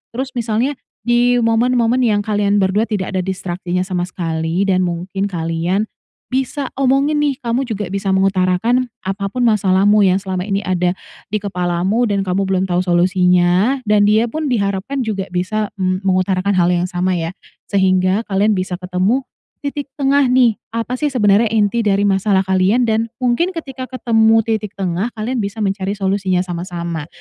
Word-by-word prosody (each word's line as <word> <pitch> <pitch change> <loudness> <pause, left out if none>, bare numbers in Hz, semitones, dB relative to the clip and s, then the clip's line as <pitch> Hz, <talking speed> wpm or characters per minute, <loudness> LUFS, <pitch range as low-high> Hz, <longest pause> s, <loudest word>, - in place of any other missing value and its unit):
Terus 260 +1 -3
misalnya 245 +3 -1 0.2
di 240 +1 +3
momen-momen 235 +1 +2
yang 215 -5 +2
kalian 205 -1 +1
berdua 205 +3 +2
tidak 200 -4 -2
ada 190 - -1
distraksinya 180 -1 -3
sama 180 -1 -2
sekali. 165 0 -2
Dan 190 -2 +2
mungkin 185 +3 -3
kalian 170 +2 -1 0.5
bisa 265 +1 -2
omongin 275 +3 +2
nih. 290 -2 +1
Kamu 240 +3 -1
juga 210 -5 -4
bisa 195 -1 0
mengutarakan 195 +6 +2 0.2
apa 195 +1 -3
pun 250 +5 -2
masalahmu 205 -2 +3
yang 185 - +3
selama 185 0 -3
ini 200 0 -1
ada 180 -1 0 0.3
di 210 - -4
kepalamu 185 +4 0
dan 200 -2 0
kamu 195 +1 -1
belum 190 -1 +1
tahu 180 -2 0
solusinya 180 +6 +2
dan 210 -2 +3
dia 215 +2 +4
pun 310 +2 -2
diharapkan 215 +3 -1
juga 200 -4 -3
bisa, 185 +4 -2
mmm, 185 -2 -1
mengutarakan 185 +1 +1
hal 175 -1 +3
yang 175 0 0
sama 180 0 -1
ya. 165 +2 -4 0.3
Sehingga 190 +1 +2
kalian 205 +1 +1
bisa 185 -1 -3
ketemu 185 +8 0 0.4
titik 285 0 -4
tengah 280 -1 +2
nih. 245 -3 +3 0.2
Apa 230 +2 -2
sih 300 - +1
sebenarnya 210 -2 +3
inti 220 +1 +1
dari 200 0 +2
masalah 195 -1 +2
kalian 190 +6 +2
dan 225 0 +1
mungkin 255 +9 +1
ketika 270 -5 -6
ketemu 225 -3 +3
titik 215 -2 -3
tengah, 190 +1 -1
kalian 235 +3 -2
bisa 205 +1 -3
mencari 195 0 -1
solusinya 190 -2 0
sama-sama. 170 -3 -5
200 Hz, 160 wpm, -18 LUFS, 185-230 Hz, 0.5 s, dia